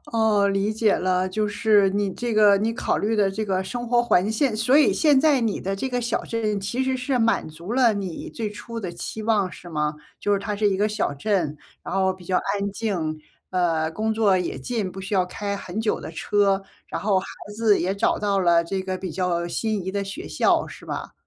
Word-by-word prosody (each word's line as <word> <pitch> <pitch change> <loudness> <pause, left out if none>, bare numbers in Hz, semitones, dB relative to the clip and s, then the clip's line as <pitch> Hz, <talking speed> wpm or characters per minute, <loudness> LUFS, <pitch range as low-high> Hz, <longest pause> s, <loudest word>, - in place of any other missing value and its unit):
哦， 215 -3 +3
理 195 +2 0
解 220 -1 +2
了， 185 0 +1
就 210 +3 -1
是 205 -1 +3
你 200 0 0
这 240 +3 -3
个 210 -2 +6
你 220 +3 0
考 - - -1
虑 215 +2 0
的 200 -2 +3
这 215 +3 -3
个 190 -2 0
生 240 +5 -5
活 240 0 +4
环境 220 +3 +2
所 240 +5 +3
以 300 - +5
现 295 -4 +4
在 290 -3 +4
你 225 -4 -1
的 195 +1 -2
这 265 +7 -2
个 245 -1 -1
小 235 0 -1
镇， 215 -3 -1
其 210 +7 -2
实 260 0 0
是 255 0 -1
满 225 -7 +1
足 170 +7 -8
了 245 -2 +4
你 195 -4 -5
最 220 -2 -4
初 230 +3 -7
的 185 -5 -4
期 195 +5 -6
望， 210 -4 +1
是 175 - -11
吗？ 150 -2 -1 0.2
就 205 - 0
是 200 - +3
它 205 +1 -3
是 210 0 +2
一 195 - 0
个 205 +2 +2
小 210 -7 -1
镇， 160 -2 -1 0.3
然 - - -5
后 190 -1 +2
比 185 -1 -14
较 185 +1 0
安 200 0 -2
静。 175 -8 -2 0.3
呃， 165 -3 +1
工 220 +5 -1
作 205 -4 +3
也 180 - -3
近， 215 -7 -3
不 190 - -7
需 195 +2 -7
要 185 -2 +3
开 200 +2 -4
很 195 +1 -5
久 220 -1 0
的 - - -7
车。 200 -1 +1 0.2
然 - - -4
后， 200 -2 +3
孩 185 - -5 0.3
子 220 -2 +3
也 185 +2 0
找 - - +2
到 200 -1 0
了 170 -2 +4
这 190 +3 -3
个 185 0 -3
比 185 -1 -5
较 175 0 -1
心 215 +1 -2
仪 190 - -2
的 200 +1 -2
学 265 - -7
校， - - +2
是 - - -12
吧？ - - -5
200 Hz, 250 characters per minute, -24 LUFS, 185-220 Hz, 0.3 s, 个